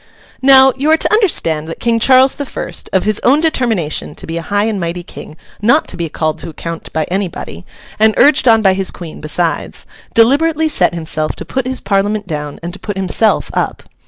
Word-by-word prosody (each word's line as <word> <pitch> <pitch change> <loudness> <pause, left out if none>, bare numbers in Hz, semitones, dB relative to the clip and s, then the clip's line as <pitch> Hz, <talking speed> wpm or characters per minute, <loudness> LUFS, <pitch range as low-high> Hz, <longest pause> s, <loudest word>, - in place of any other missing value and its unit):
Now, 265 0 +6
you 280 +4 -1
are 320 - +5
to - - +1
understand 165 - +1
that 165 - -7
King 230 -1 +1
Charles 260 +2 +5
the 285 - -5
First—of 190 -6 -3
his 215 0 +1
own 275 +4 +4
determination 225 - -1
to - - -9
be 165 - -5
a - - -3
high 205 +5 -1
and 215 -2 -1
mighty 175 0 -4
King 155 - -11 0.3
not 240 +9 +3
to - - -3
be 170 -2 -4
called 155 0 -2
to - - -7
account 165 +1 -7
by 160 - -1
anybody, 180 - -4 0.3
and 220 0 +4
urged 290 -2 +4
on 225 -1 +5
by 190 -1 +4
his 190 0 -1
Queen 170 -3 -9
besides—deliberately 265 - 0
set 185 - +1
himself 155 -2 -3
to - - -8
put 265 -1 -3
his 260 0 -2
Parliament 205 +1 0
down 150 -4 -5
and 175 +1 -5
to 200 - -10
put 205 -2 -6
himself 195 +3 +1
up. - - -2
205 Hz, 200 wpm, -15 LUFS, 170-260 Hz, 0.3 s, Now